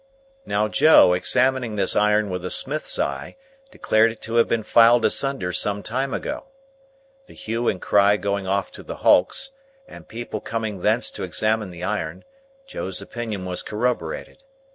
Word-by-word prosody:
Now, 105 +1 +1
Joe, 105 - +6
examining 125 +5 +1
this 100 -2 0
iron 105 -1 +2
with 90 -1 -4
a 90 - -4
smith's 150 +9 +1
eye, - - -3 0.3
declared 115 - +2
it 110 - -13
to 115 - -6
have 115 - +4
been 115 -2 -1
filed 115 +2 +5
asunder 135 -10 -1
some 100 +4 +1
time 130 +3 -2
ago. - - -4 0.8
The - - -16
hue 115 +2 -3
and 90 - 0
cry 100 +1 +3
going 100 -1 -3
off 100 0 -1
to - - -9
the - - -8
Hulks, 265 - +3 0.4
and - - -13
people 120 +1 -6
coming 110 -4 -4
thence - - +2
to - - -6
examine 110 -2 -1
the 90 0 -10
iron, 95 -6 -3 0.4
Joe's 95 - -5
opinion 110 -5 -6
was 90 -1 -3
corroborated. 110 - -3
105 Hz, 165 wpm, -22 LUFS, 95-120 Hz, 0.8 s, Joe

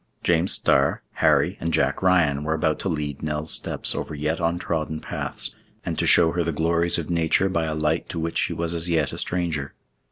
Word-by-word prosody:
James 85 +2 +2
Starr, 70 +1 +2
Harry, - - +2
and 85 - -2
Jack 80 - +1
Ryan 85 -6 +3
were 80 +1 0
about 80 -1 0
to 95 - -2
lead 75 -4 -3
Nell's 75 +1 -3
steps - - +1
over 75 - -5
yet 75 +3 -2
untrodden 85 -2 -2
paths, - - -5 0.3
and - - -2
to - - +1
show 85 -2 +6
her 85 +1 0
the 85 - -1
glories 85 +2 +1
of 85 -1 -4
nature 85 +3 +2
by 85 -3 0
a 80 -1 -2
light 80 +2 -1
to 85 - -4
which 80 +1 -2
she - - 0
was 85 0 -3
as 85 +1 -1
yet 80 -4 +1
a - - -5
stranger. 85 -6 -2
80 Hz, 210 wpm, -24 LUFS, 75-85 Hz, 0.3 s, show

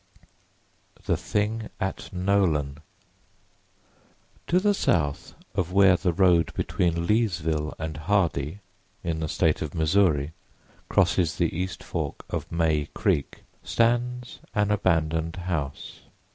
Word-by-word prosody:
THE - - +2
THING 110 +1 -2
AT 95 -2 -4
NOLAN 90 -7 +1 1.7
TO 180 - +3
the 205 +2 +3
south 75 - 0 0.2
of 90 -3 -1
where 95 -1 +6
the 90 - 0
road 85 -1 +3
between 85 -1 0
Leesville 80 -8 0
and 80 -2 -5
Hardy, 85 -1 0 0.4
in 85 -2 -2
the 80 -1 -2
State 80 -3 +1
of 75 - -4
Missouri, 80 -3 +2 0.6
crosses 90 -2 +2
the - - 0
east 90 +1 -3
fork - - -4
of - - -4
May 80 -3 +1
Creek 70 - 0 0.2
stands 120 +1 0 0.2
an 105 0 +2
abandoned 80 -4 +1
house. 85 -6 -4
85 Hz, 115 wpm, -26 LUFS, 80-100 Hz, 1.7 s, where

